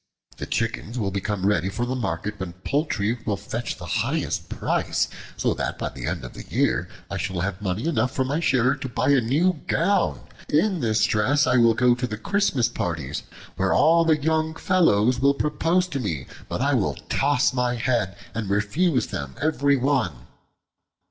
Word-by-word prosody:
The - - -5
chickens 115 +1 -2
will 100 -5 -1
become 100 0 -2
ready 95 -3 +2
for 120 +5 -2
the 125 - -2
market 105 -3 -3
when 95 -2 -5
poultry 115 - -1
will 100 -2 -1
fetch - - -4
the - - -8 0.2
highest - - -2
price, - - 0 0.3
so - - +1
that - - -3
by - - -3
the - - -7
end - - -3
of 60 - -9
the - - -9
year - - 0 0.2
I 100 - -2
shall 95 -1 -2
have 95 +1 -3
money 100 +4 -2
enough 155 -6 +1
from 130 -1 -1
my 145 +3 0
share 130 -5 +3
to 140 -2 -6
buy 120 - 0
a 135 -3 +5
new 155 +8 +1
gown. 200 +5 +1 0.3
In 180 +5 +2
this 110 -4 +1
dress 135 +7 +2
I 125 - +3
will 115 -2 +5
go 125 0 +4
to 125 +1 -2
the 110 -2 -5
Christmas 140 - +1
parties, 80 - -3 0.4
where - - +2
all 165 +2 +5
the 160 -2 +3
young 160 +1 0
fellows 125 - +3
will 140 +2 +3
propose 165 +5 +1
to 140 - -3
me, 80 - -3 0.2
but - - -3
I - - +2
will - - +1
toss 140 -1 +2
my 125 -1 0
head 115 -6 0 0.2
and 110 -2 -3
refuse 125 - +1
them 70 -2 -6
every 145 -2 +2
one." 125 - 0
125 Hz, 190 wpm, -24 LUFS, 100-145 Hz, 0.4 s, a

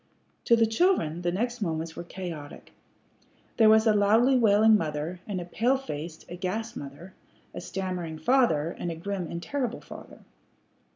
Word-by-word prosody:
To 235 - +6
the 230 -1 +4
children 225 - +1
the 175 0 0
next 235 +6 -2
moments 160 -3 -3
were - - -6
chaotic. 170 -5 -8 0.8
There 220 -2 +6
was 220 +1 +5
a 220 - +5
loudly 220 +6 +4
wailing 220 -2 +5
mother, 160 0 -2
and 200 -3 -3
a 175 - -6
pale 240 +9 +1
faced, 160 - -7
aghast 200 +6 -4
mother; 145 +7 -9 0.4
a - - -6
stammering 180 -4 -4
father, 170 - +2
and 175 - -3
a 165 - -4
grim 185 +1 -4
and 170 0 -5
terrible 250 +2 -3
father. - - -12
190 Hz, 160 wpm, -27 LUFS, 165-225 Hz, 0.8 s, To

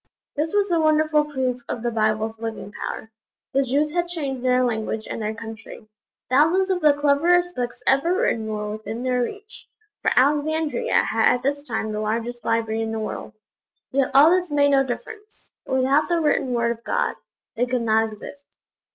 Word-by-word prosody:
This 315 +5 -2
was 405 -2 +2
a 335 - +3
wonderful 310 -1 +3
proof 260 -4 -2
of 230 - -4
the 240 - 0
Bible's 220 0 0
living 225 -2 -6
power. 220 +1 -6 0.4
The 275 - +3
Jews 285 +3 0
had 345 0 0
changed 280 -7 -4
their 255 0 +3
language 220 -2 -2
and - - -5
their 215 +1 -3
country. 225 -1 -10 0.4
Thousands 325 +9 +3
of 360 -1 0
the 300 -1 +6
cleverest 335 +5 +2
books 245 0 -4
ever 275 +6 +3
written 225 - 0
were 210 -1 -3
within 220 +2 -6
their 250 -1 +1
reach 410 - -7 0.3
for - - +2
Alexandria 295 0 +1
had 225 0 +3
at 245 - -6
this 285 +1 -1
time 220 -2 -2
the 210 - -3
largest 230 +3 -3
library 225 -1 0
in 225 0 -2
the 225 - -3
world 215 0 -5 0.6
yet 270 -1 +1
all 295 +4 +8
this 360 -1 +1
made 285 -1 +3
no 270 -1 +4
difference; 420 - -8 0.2
without 265 +4 +2
the 345 -1 +2
written 295 -4 +1
Word 235 -1 +1
of 230 0 -7
God, - - 0 0.4
they 245 +2 0
could 250 -1 -1
not 220 0 +2
exist. 280 +7 -12
255 Hz, 185 wpm, -23 LUFS, 225-300 Hz, 0.6 s, all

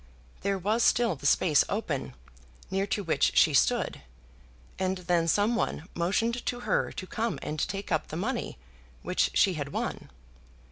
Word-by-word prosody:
There 200 0 0
was 210 +5 0
still 235 -5 +3
the 140 0 -2
space 150 -3 +4
open, 155 - -3 0.6
near 195 +1 0
to 205 - -1
which 165 - +1
she - - +6
stood, - - +2 0.8
and 190 0 0
then 175 -2 +1
someone 205 -3 +1
motioned 225 +8 0
to 245 0 -2
her - - 0
to 185 - -6
come 230 +4 -2
and 155 - -4
take 195 +4 -3
up 155 -1 0
the - - -7
money 235 +7 -3 0.5
which - - +1
she 190 - +4
had 145 -4 -4
won. - - -4
190 Hz, 155 wpm, -28 LUFS, 165-220 Hz, 0.8 s, she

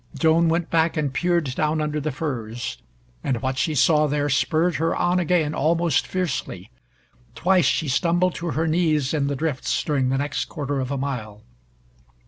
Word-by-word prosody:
Joan 165 +1 +3
went 165 +1 -1
back 165 0 +2
and 145 -3 -1
peered 170 -4 0
down 155 +3 0
under 150 0 -1
the 155 +1 -2
furs, 120 -5 -4 0.4
and 125 -4 -1
what 130 0 -1
she 155 - 0
saw 150 +2 +4
there 145 0 0
spurred 155 +6 +1
her 165 +1 0
on 175 +1 +1
again 165 -3 +1
almost 165 0 +1
fiercely. 180 -7 -3 0.6
Twice 180 +7 +3
she 160 - +1
stumbled 175 +6 +1
to 170 0 -4
her 160 +1 0
knees 155 -4 +1
in 145 -3 0
the 140 - -1
drifts 145 -1 -1
during 135 -4 0
the 135 - +1
next 145 +1 -2
quarter 145 -2 -3
of 130 -1 -3
a 140 - -2
mile. 115 -6 -5
150 Hz, 175 wpm, -23 LUFS, 135-165 Hz, 0.6 s, saw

